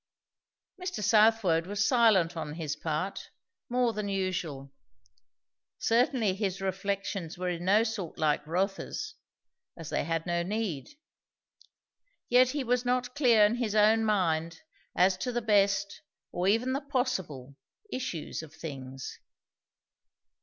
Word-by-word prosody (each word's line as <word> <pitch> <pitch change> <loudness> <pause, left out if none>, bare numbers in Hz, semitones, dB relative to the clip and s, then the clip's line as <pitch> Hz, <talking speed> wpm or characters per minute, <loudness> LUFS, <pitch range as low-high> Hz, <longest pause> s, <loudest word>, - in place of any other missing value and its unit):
Mr. 365 - -4
Southwode 210 -5 +4
was 205 +2 0
silent 215 -9 +4
on 155 -2 -4
his 155 -3 -3
part, 160 +4 -3 0.4
more 245 -1 +1
than 210 -1 -3
usual. 175 -8 -3 1.0
Certainly 230 -3 +2
his 195 -1 -2
reflections 195 -2 -3
were 180 0 -2
in 175 0 -4
no 205 +4 +5
sort 215 -7 -4
like 150 -2 +1
Rotha's, 195 - -2 0.6
as 165 -3 -8
they - - 0
had 165 +1 -2
no 175 -1 0
need; 190 -6 -3 1.4
yet 250 +1 +5
he 285 +1 -2
was 250 0 +1
not 250 0 0
clear 240 -7 +5
in 220 +3 +1
his 225 -4 -2
own 215 +1 +5
mind 165 -6 0 0.3
as 185 +1 +4
to 250 +7 -3
the 240 - 0
best, 200 -3 +1 0.3
or 180 +1 -1
even 230 +6 +2
the 275 - -1
possible, 190 - -3 0.4
issues 250 -15 -4
of 160 -1 -12
things. 135 -4 -7
195 Hz, 130 wpm, -29 LUFS, 165-230 Hz, 1.4 s, no